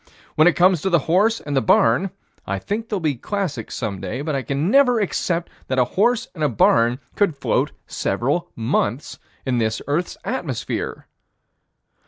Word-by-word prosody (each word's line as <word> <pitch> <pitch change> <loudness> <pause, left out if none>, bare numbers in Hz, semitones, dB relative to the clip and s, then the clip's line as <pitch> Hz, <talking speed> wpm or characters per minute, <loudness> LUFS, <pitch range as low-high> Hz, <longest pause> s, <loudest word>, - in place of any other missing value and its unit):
When 155 +2 +5
it 175 - +4
comes 180 -2 +4
to 190 - 0
the 175 - +4
horse 210 +7 +3
and 145 -1 -4
the 135 - +3
barn 115 - +3 0.4
I 100 - -1
think 205 - -3
that - - -37
they'll 205 - -1
be 155 -4 0
classics 145 - -4
some 100 -6 -4
day, 110 +9 -4
but 155 0 -2
I 135 - 0
can 140 - -1
never 250 -3 +5
accept 175 -4 -1 0.2
that 130 - -1
a 125 - +4
horse 235 +5 +2
and 160 -4 -4
a 150 - +3
barn 115 +2 +3 0.2
could 195 -8 +1
float - - 0
several 145 +8 -1
months 115 +3 -1 0.3
in 125 -3 +1
this 110 -1 0
earth's 155 +6 -1
atmosphere. - - -3
150 Hz, 180 wpm, -21 LUFS, 125-190 Hz, 0.4 s, When